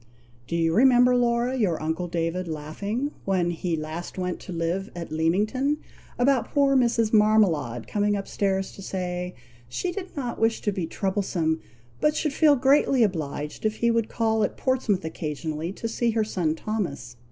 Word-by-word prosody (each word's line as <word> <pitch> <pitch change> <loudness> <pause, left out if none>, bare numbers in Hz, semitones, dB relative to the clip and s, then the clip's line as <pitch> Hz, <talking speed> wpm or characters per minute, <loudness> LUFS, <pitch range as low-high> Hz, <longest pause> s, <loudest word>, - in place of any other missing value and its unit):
"Do 170 - -2
you 165 -1 +2
remember, 250 +2 +6
Laura, 240 +1 +2
your 195 -10 +1
uncle 160 +3 -2
David 170 +1 -2
laughing, 200 - -3
when 180 -3 +1
he 170 0 -2
last 155 +4 -6
went 180 -1 -2
to - - -9
live 170 +3 -2
at 170 -2 -6
Leamington, 210 - +1 0.4
about 255 -1 +2
poor 280 -1 +3
Mrs. 235 -3 +2
Marmalade 185 - +3
coming 205 0 +1
up 195 -1 -4
stairs 195 -1 -1
to - - -11
say, 180 -1 -4 0.3
she 355 - -2
did 375 -3 -7
not 245 -4 -3
wish 225 0 +2
to 205 - 0
be 185 -4 -3
troublesome, 185 -5 -1 0.4
but 300 0 +2
should 300 -3 0
feel 300 -1 +5
greatly 270 -1 +4
obliged 150 -6 -3
if 215 0 +1
he 235 +1 +2
would 230 -1 0
call 220 -1 +1
at 205 - -2
Portsmouth 225 -9 0
occasionally 160 +1 -4
to 230 - -4
see 235 +1 0
her 225 -1 +1
son 175 -7 -1
Thomas. 155 - -4
195 Hz, 170 wpm, -25 LUFS, 165-235 Hz, 0.4 s, remember